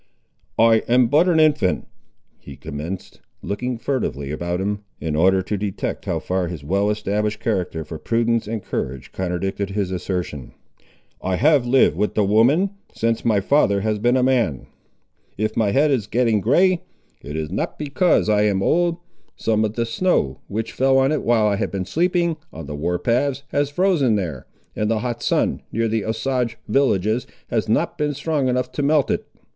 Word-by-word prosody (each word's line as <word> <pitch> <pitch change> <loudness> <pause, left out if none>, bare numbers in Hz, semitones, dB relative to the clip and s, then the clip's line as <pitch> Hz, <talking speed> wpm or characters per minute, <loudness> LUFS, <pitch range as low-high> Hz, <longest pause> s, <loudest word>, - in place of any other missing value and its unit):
"I 115 0 +6
am 125 0 +4
but 155 +6 +4
an 170 -3 +3
infant," 150 -12 +2 0.5
he 70 - -11
commenced, 80 +6 -7 0.2
looking 125 +4 -3
furtively 95 - -2
around 85 +3 -2
him, 100 +2 -2 0.2
in 80 -2 -2
order 95 +4 +3
to 105 +2 -2
detect 100 -1 -4
how - - -1
far 90 -1 -1
his 85 -4 -7
well 100 +7 +1
established 105 0 -1
character 90 -7 -2
for 80 0 -7
prudence 115 -1 0
and 110 -2 -4
courage 65 0 -4
contradicted 95 +2 -2
his 100 -2 -2
assertion. 90 -7 -4 0.7
"I 95 0 -1
have 140 - +3
lived 130 +2 +4
with 105 - 0
the 105 - +3
women, 125 - +3 0.2
since 115 0 -1
my 105 -4 +2
father 100 -5 +3
has 110 0 -1
been 120 +4 +3
a 125 - +2
man. 120 - +1 0.7
If 110 +1 -1
my 110 -3 +2
head 145 +8 +3
is 115 -7 0
getting 115 -2 +2
grey, 175 - +3 0.4
it 75 +2 -7
is 80 0 -3
not - - -3
because 155 - +2
I 105 -1 +3
am 100 -2 +1
old. 170 0 +2 0.4
Some 110 -1 +1
of 105 -1 -1
the 115 - 0
snow, 115 - 0
which 110 +3 -3
fell 135 0 +3
on 135 +1 +3
it 155 - 0
while 115 -2 +2
I 105 -1 +2
have - - -2
been 95 -2 -3
sleeping 170 - +1
on 80 -1 -8
the 75 - -6
war 85 +4 -1
paths, 130 +6 0
has 145 +1 0
frozen 145 - +2
there, 85 -10 -4 0.3
and 105 0 -1
the 110 -1 0
hot 120 -1 -3
sun, - - +1
near 115 +1 0
the 110 -1 -1
Osage 115 +1 -1
villages, 110 -2 +1 0.2
has - - -1
not - - 0
been 150 -1 0
strong 145 -1 -1
enough 125 0 0
to 145 - -3
melt 145 0 +2
it." - - -2
110 Hz, 185 wpm, -21 LUFS, 95-135 Hz, 0.7 s, I